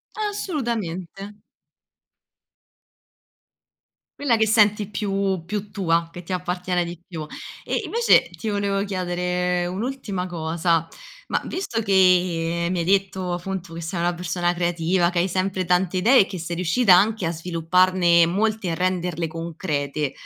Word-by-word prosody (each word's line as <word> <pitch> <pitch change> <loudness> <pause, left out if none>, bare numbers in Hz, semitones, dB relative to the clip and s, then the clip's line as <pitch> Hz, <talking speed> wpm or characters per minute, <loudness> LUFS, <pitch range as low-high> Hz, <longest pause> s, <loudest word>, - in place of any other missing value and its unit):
Assolutamente. 230 - -3 2.9
Quella 250 -5 +2
che 220 - +3
senti 210 -2 +3
più 195 -3 -1
più 205 +3 -5
tua, 170 -4 0
che 175 - -8
ti 185 +2 -6
appartiene 180 0 -1
di 170 0 -8
più. 160 -4 -6 0.4
E, - - -1
invece, 470 +1 +3
ti 225 - -7
volevo 200 -1 0
chiedere 180 -1 -1
un'ultima 200 -1 -3
cosa, 165 -1 0 0.4
ma - - 0
visto 245 -12 -3
che 180 -4 +2
mi 185 - -1
hai 170 - -1
detto, 190 -1 0
appunto, 175 -1 -5
che 170 - -6
sei 170 +1 -3
una 175 +1 +1
persona 175 0 -1
creativa, 175 0 +1
che 180 - -5
hai 175 +2 +2
sempre 185 0 -1
tante 180 +1 +1
idee 240 +8 +5
e - - +2
che 190 - -6
sei 170 +1 -5
riuscita 185 +4 +4
anche 205 +1 +2
a 165 - 0
svilupparne 170 +1 +3
molte, 215 +3 0
e 170 - 0
a - - -1
renderle 180 -2 -1
concrete, 155 -3 -3
180 Hz, 140 wpm, -23 LUFS, 170-195 Hz, 2.9 s, idee